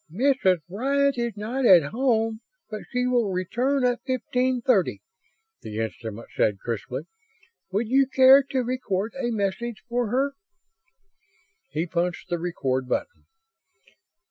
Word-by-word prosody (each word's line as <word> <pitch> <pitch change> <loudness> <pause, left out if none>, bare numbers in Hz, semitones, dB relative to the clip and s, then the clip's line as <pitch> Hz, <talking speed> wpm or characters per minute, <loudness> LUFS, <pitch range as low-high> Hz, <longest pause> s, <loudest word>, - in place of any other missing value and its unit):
"Mrs. 195 - +2
Bryant 275 +8 +1
is 235 -3 -2
not 235 +6 -3
at 175 - +6
home, 225 -2 +1 0.3
but 215 - -5
she 250 0 0
will 240 -5 +1
return 250 +9 0
at 245 -1 +1
fifteen 255 0 0
thirty," 230 -6 +2 0.6
the 105 - -7
instrument 110 0 -5
said, 105 -2 +2
crisply. 120 +4 -4 0.7
"Would 210 +4 0
you 270 +3 +3
care 265 +1 +7
to 260 -2 0
record 230 -4 -2
a 265 -3 -2
message 215 +1 -2
for 240 -1 0
her?" 270 +5 0 1.4
He 155 +4 -2
punched 175 +1 -2
the 175 - -1
RECORD 130 -7 -2
button. 485 - -3
230 Hz, 130 wpm, -25 LUFS, 180-255 Hz, 1.4 s, care